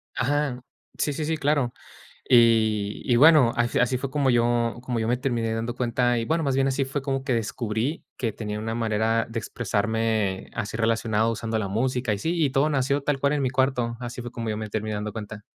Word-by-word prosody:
Ajá, 135 -1 0 0.4
sí, 145 - 0
sí, 155 +1 -3
sí, 160 0 -1
claro. 145 -4 +1 0.6
Y 110 -4 +3
y 120 - +2
bueno, 150 -4 +7
al 120 0 +2
fi - - -1
así 125 0 +2
fue 135 0 -4
como 140 -2 +2
yo 120 0 +2
como 120 -3 -2
yo 110 - -1
me 125 - +2
terminé 120 -3 -1
dando 115 +2 -3
cuenta 120 0 +1
y, 115 - -1
bueno, 160 +2 0
más 135 -1 +1
bien 135 0 +2
así 135 +1 0
fue 135 +1 -4
como 135 -1 -2
que 135 - 0
descubrí 115 +4 -2
que 115 -4 -2
tenía 105 -1 -5
una 115 +1 -3
manera 115 0 +1
de 115 0 -4
expresarme 110 -3 -1
así 105 +2 -4
relacionado 115 -1 +1
usando 110 0 -2
la 100 -3 -2
música 125 +2 0
y 100 - -2
sí, 165 +6 -1
y 135 - +1
todo 140 +4 +2
nació 140 0 +1
tal 145 -1 0
cual 140 +1 +1
en 145 -2 0
mi 130 - +1
cuarto, 125 -3 0
así 120 0 -6
fue 120 - -7
como 115 -2 -5
yo 105 - -2
me 110 0 -5
terminé 110 0 -2
dando 105 0 -4
cuenta. 105 -1 -7
120 Hz, 225 wpm, -25 LUFS, 110-135 Hz, 0.6 s, bueno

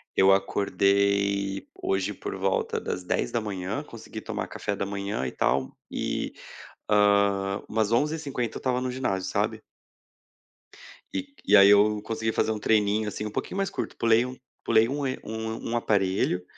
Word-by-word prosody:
Eu 95 0 +6
acordei 100 0 +1
hoje 95 +1 -1
por 95 - -6
volta 95 0 0
das 90 - -4
10h, 95 - -2
consegui - - -9
tomar - - -4
café 100 - -3
da 100 - -2
manhã 100 -7 -3
e 65 - -3
tal, 65 0 0
e, - - -3 0.6
ah, 100 -1 +3
umas 110 -1 0
11h50, 140 -3 -1
eu - - -4
estava 125 -1 0
no 130 0 -2
ginásio, 95 -8 -2
sabe? - - -1 1.5
E 95 +8 -4
e 105 - +6
aí, 100 -1 +9
eu 105 +1 +5
consegui 110 +1 -2
fazer 110 - +1
um 110 - -3
treininho, 105 0 +2
assim, 105 +1 -4
um 105 - -4
pouquinho 185 - -4
mais 195 -1 0
curto. - - -5
Pulei 115 +1 +4
um 125 0 -6 0.3
pulei 115 0 +4
um 140 +1 -2
er 130 - -2
um 110 +1 -5
um - - 0
aparelho, 95 -4 +1
105 Hz, 160 wpm, -26 LUFS, 100-110 Hz, 1.5 s, aí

